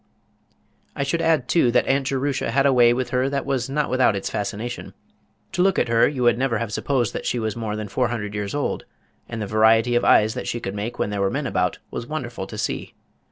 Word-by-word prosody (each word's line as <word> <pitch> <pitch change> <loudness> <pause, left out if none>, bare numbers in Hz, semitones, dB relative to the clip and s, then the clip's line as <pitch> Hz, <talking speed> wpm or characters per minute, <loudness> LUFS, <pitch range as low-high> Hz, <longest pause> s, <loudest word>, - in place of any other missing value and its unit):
I - - -1
should 165 +4 -1
add 160 -6 +2
too 165 -5 +3
that 125 - +3
Aunt 135 0 +1
Jerusha 135 -1 -1
had 135 +4 +2
a 140 - +5
way 120 -2 +6
with 125 +1 -1
her 130 +1 +1
that 140 -1 -2
was 135 -2 -1
not 150 +2 0
without 130 -4 +3
its 100 - -3
fascination. 110 +4 -4 0.6
To 185 -2 0
look 195 +1 +3
at - - +1
her 115 0 +4
you 130 -4 -2
would 120 0 +3
never 130 -4 +1
have 110 -2 -4
supposed 125 -4 0
that - - -4
she - - 0
was 110 -2 -2
more 110 -2 -3
than 105 -1 -4
four 125 +5 0
hundred 105 -3 -4
years 105 +3 -3
old, 145 - -2 0.4
and 115 - -5
the 105 - -2
variety 110 +3 +4
of 120 - +2
eyes 110 +1 +5
that 125 - -5
she 120 - -2
could 95 -4 -5
make 105 +4 -4
when 105 - -1
there 100 -1 -2
were 100 - +2
men - - -2
about, - - 0
was 120 - -5
wonderful 120 -10 -5
to - - -8
see. - - -3
120 Hz, 245 wpm, -23 LUFS, 110-135 Hz, 0.6 s, way